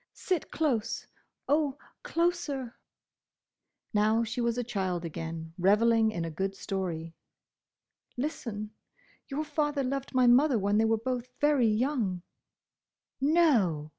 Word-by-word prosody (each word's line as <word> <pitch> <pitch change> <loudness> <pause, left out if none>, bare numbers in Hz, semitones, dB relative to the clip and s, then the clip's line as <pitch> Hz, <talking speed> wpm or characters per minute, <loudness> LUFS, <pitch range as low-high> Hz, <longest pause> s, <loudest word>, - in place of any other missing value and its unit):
"Sit 365 -3 -2
close! 265 -9 -1 0.4
Oh, 290 -1 +1 0.2
closer!" 330 -8 -1 1.2
Now 215 +2 +3
she 230 +2 -3
was 235 0 0
a 245 - 0
child 190 -7 -2
again, 160 0 -6
revelling 220 +4 +4
in 170 -6 -3
a 165 - -4
good 195 +5 -2
story. 175 -5 -4 1.0
"Listen. 230 -7 -4 0.6
Your 295 +2 -2
father 295 -2 -1
loved 270 +1 -3
my 255 -1 +5
mother 250 +2 +5
when 205 +1 +2
they 225 - +4
were 225 0 +2
both 250 +2 -3
very 290 -5 +4
young—" 215 -5 0 1.0
"No!" 250 - +3
230 Hz, 120 wpm, -29 LUFS, 195-280 Hz, 1.2 s, my